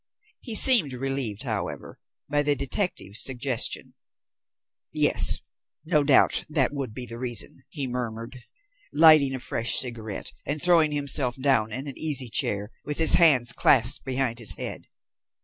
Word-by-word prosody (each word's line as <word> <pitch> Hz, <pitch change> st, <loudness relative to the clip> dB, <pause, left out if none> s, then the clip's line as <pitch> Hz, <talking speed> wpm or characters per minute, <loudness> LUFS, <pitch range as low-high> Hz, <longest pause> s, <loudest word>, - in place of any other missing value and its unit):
He 230 Hz, -4 st, -7 dB
seemed 215 Hz, -, +6 dB
relieved, 130 Hz, -4 st, -2 dB
however, 110 Hz, -6 st, -7 dB, 0.3 s
by 145 Hz, +1 st, -1 dB
the 145 Hz, 0 st, +1 dB
detective's 135 Hz, -, -2 dB
suggestion. 130 Hz, -2 st, -2 dB, 1.0 s
"Yes, -, -, +4 dB, 0.4 s
no 155 Hz, -3 st, +1 dB
doubt, 140 Hz, -1 st, +2 dB
that 145 Hz, -3 st, 0 dB
would 135 Hz, -6 st, -6 dB
be 125 Hz, -, -3 dB
the 115 Hz, -1 st, -8 dB
reason," 125 Hz, +1 st, -1 dB
he 145 Hz, -4 st, -4 dB
murmured, 120 Hz, 0 st, -7 dB, 0.5 s
lighting 155 Hz, -3 st, +4 dB
a -, -, -7 dB
fresh 115 Hz, -1 st, -2 dB
cigarette, 115 Hz, -5 st, -3 dB
and 145 Hz, +2 st, -5 dB
throwing 165 Hz, -2 st, +2 dB
himself 140 Hz, -3 st, +1 dB
down 130 Hz, -5 st, 0 dB
in 130 Hz, +5 st, -6 dB
an 140 Hz, -3 st, -10 dB
easy 140 Hz, -6 st, -2 dB
chair, 105 Hz, 0 st, -2 dB
with 150 Hz, 0 st, -5 dB
his 160 Hz, -1 st, +7 dB
hands 135 Hz, -8 st, +4 dB
clasped 125 Hz, -1 st, +2 dB
behind 130 Hz, -3 st, -3 dB
his 105 Hz, -5 st, -1 dB
head. -, -, -7 dB
135 Hz, 145 wpm, -24 LUFS, 120-145 Hz, 1.0 s, his